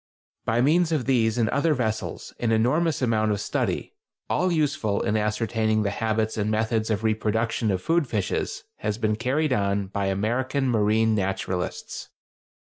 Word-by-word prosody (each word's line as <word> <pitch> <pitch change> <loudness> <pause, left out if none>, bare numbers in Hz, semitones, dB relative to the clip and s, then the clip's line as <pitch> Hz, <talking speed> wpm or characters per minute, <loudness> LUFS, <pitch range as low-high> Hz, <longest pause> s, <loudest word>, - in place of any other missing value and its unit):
By 115 +2 +2
means 165 +5 +3
of 150 -7 0
these 115 -3 +2
and 115 -2 +2
other 155 +2 +2
vessels 110 -4 -3
an 115 -2 0
enormous 130 +7 +2
amount 110 -3 +2
of 100 - -1
study—all 180 - -2
useful 145 -10 0
in 105 - 0
ascertaining 110 0 +1
the 100 - 0
habits 110 +1 -1
and 105 0 0
methods 110 +1 0
of 110 0 -1
reproduction 110 +1 0
of 95 -2 -1
food 165 -3 +2
fishes—has 105 0 -3
been 110 -2 +1
carried 130 +6 0
on 100 -2 0
by 100 0 -1
American 120 +8 0
marine 110 0 +3
naturalists. 95 -3 -3
110 Hz, 145 wpm, -25 LUFS, 105-130 Hz, -, means